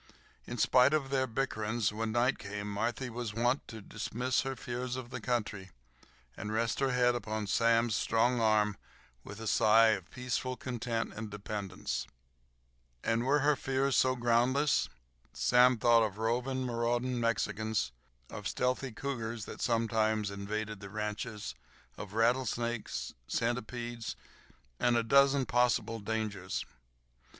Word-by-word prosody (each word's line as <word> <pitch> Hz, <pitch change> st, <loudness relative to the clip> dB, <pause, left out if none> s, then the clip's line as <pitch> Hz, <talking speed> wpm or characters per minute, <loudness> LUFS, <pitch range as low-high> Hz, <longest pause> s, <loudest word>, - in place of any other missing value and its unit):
In 120 Hz, -, -5 dB
spite 130 Hz, +5 st, +5 dB
of 135 Hz, -3 st, -1 dB
their 130 Hz, -1 st, +1 dB
bickerings, 110 Hz, -3 st, -1 dB
when 110 Hz, +1 st, -2 dB
night 125 Hz, +3 st, +2 dB
came 100 Hz, 0 st, -5 dB
Marthy 115 Hz, +5 st, -2 dB
was 120 Hz, -3 st, -5 dB
wont 120 Hz, +4 st, +1 dB
to 110 Hz, -1 st, -8 dB
dismiss 125 Hz, +6 st, -1 dB
her 135 Hz, 0 st, -3 dB
fears 125 Hz, 0 st, -4 dB
of 130 Hz, -1 st, -7 dB
the 125 Hz, -, -5 dB
country, 105 Hz, -5 st, -2 dB, 0.7 s
and 105 Hz, -, -5 dB
rest 115 Hz, +1 st, 0 dB
her 135 Hz, -1 st, +2 dB
head 125 Hz, -1 st, +3 dB
upon 110 Hz, -2 st, -3 dB
Sam's 115 Hz, +1 st, +3 dB
strong 120 Hz, +1 st, +2 dB
arm 105 Hz, -2 st, +3 dB, 0.5 s
with 105 Hz, +1 st, -9 dB
a 115 Hz, -, -6 dB
sigh 110 Hz, +1 st, +5 dB
of 95 Hz, -5 st, -1 dB
peaceful 125 Hz, 0 st, -3 dB
content 120 Hz, -2 st, -3 dB
and 110 Hz, 0 st, -6 dB
dependence. 100 Hz, -2 st, -4 dB, 1.0 s
And 115 Hz, +1 st, +1 dB
were 145 Hz, +2 st, +3 dB
her 145 Hz, +1 st, +4 dB
fears 135 Hz, -1 st, 0 dB
so 130 Hz, 0 st, +4 dB
groundless? 125 Hz, +4 st, +2 dB, 0.4 s
Sam 125 Hz, 0 st, +5 dB
thought 115 Hz, +1 st, +5 dB
of 105 Hz, -2 st, -1 dB
roving, 125 Hz, +4 st, 0 dB
marauding 120 Hz, +1 st, 0 dB
Mexicans, 110 Hz, -, 0 dB, 0.4 s
of -, -, -5 dB
stealthy 125 Hz, +1 st, -1 dB
cougars 115 Hz, -3 st, -4 dB
that -, -, -8 dB
sometimes 110 Hz, -3 st, +1 dB
invaded 105 Hz, +1 st, -4 dB
the 100 Hz, -1 st, -9 dB
ranches, 105 Hz, -, -4 dB, 0.4 s
of 100 Hz, -1 st, -8 dB
rattlesnakes, 120 Hz, 0 st, 0 dB
centipedes, 120 Hz, 0 st, -2 dB, 0.6 s
and 120 Hz, -1 st, +3 dB
a 115 Hz, -, +2 dB
dozen 140 Hz, +3 st, +4 dB
possible 120 Hz, -2 st, +1 dB
dangers. 105 Hz, -3 st, -3 dB
115 Hz, 135 wpm, -32 LUFS, 110-125 Hz, 1.0 s, spite